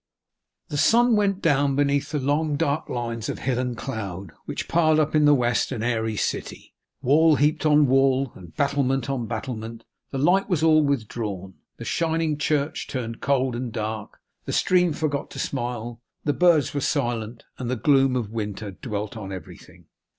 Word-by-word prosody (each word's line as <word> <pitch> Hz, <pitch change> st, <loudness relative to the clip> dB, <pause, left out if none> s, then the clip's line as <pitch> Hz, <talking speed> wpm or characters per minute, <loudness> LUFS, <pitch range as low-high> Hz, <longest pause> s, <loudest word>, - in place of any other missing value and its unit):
The 145 Hz, -, -3 dB
sun 235 Hz, +8 st, +4 dB
went 200 Hz, -2 st, +1 dB
down 145 Hz, -3 st, +3 dB
beneath 140 Hz, 0 st, +1 dB
the 150 Hz, -, -2 dB
long 145 Hz, +3 st, 0 dB
dark 145 Hz, 0 st, -1 dB
lines 115 Hz, -2 st, -3 dB
of -, -, -3 dB
hill 125 Hz, -1 st, -1 dB
and 125 Hz, -2 st, -2 dB
cloud 100 Hz, -, -5 dB
which -, -, -4 dB
piled 155 Hz, -2 st, +3 dB
up 155 Hz, -1 st, +1 dB
in 155 Hz, -1 st, +4 dB
the 145 Hz, 0 st, +6 dB
west 120 Hz, -1 st, +1 dB
an 115 Hz, -5 st, -3 dB
airy 110 Hz, -2 st, 0 dB
city, -, -, -4 dB, 0.3 s
wall 155 Hz, +4 st, +5 dB
heaped 150 Hz, +2 st, +2 dB
on 150 Hz, 0 st, +5 dB
wall, 135 Hz, -1 st, +3 dB
and 85 Hz, -4 st, -13 dB
battlement 135 Hz, -2 st, 0 dB
on 120 Hz, -4 st, -2 dB
battlement; 115 Hz, -1 st, -5 dB, 0.3 s
the 135 Hz, -, -4 dB
light 180 Hz, +9 st, +2 dB
was 165 Hz, -5 st, +1 dB
all 155 Hz, -1 st, +5 dB
withdrawn; 110 Hz, -8 st, -3 dB, 0.2 s
the -, -, -8 dB
shining 160 Hz, -2 st, 0 dB
church 150 Hz, +1 st, -1 dB
turned 115 Hz, -3 st, -5 dB
cold 130 Hz, -2 st, +1 dB
and 120 Hz, 0 st, -4 dB
dark; 110 Hz, 0 st, -4 dB, 0.3 s
the -, -, -4 dB
stream 180 Hz, -2 st, +3 dB
forgot 145 Hz, -2 st, -2 dB
to -, -, -10 dB
smile; 120 Hz, -2 st, -4 dB, 0.2 s
the 145 Hz, -, +1 dB
birds 170 Hz, -4 st, +3 dB
were 145 Hz, -, -1 dB
silent; 120 Hz, -5 st, -2 dB, 0.2 s
and 125 Hz, -2 st, -3 dB
the 130 Hz, -, 0 dB
gloom 135 Hz, +2 st, +3 dB
of 115 Hz, -5 st, -2 dB
winter 105 Hz, -2 st, -4 dB
dwelt 105 Hz, 0 st, -5 dB
on 100 Hz, -3 st, -7 dB
everything. 95 Hz, -1 st, -11 dB
135 Hz, 175 wpm, -24 LUFS, 115-150 Hz, 0.3 s, the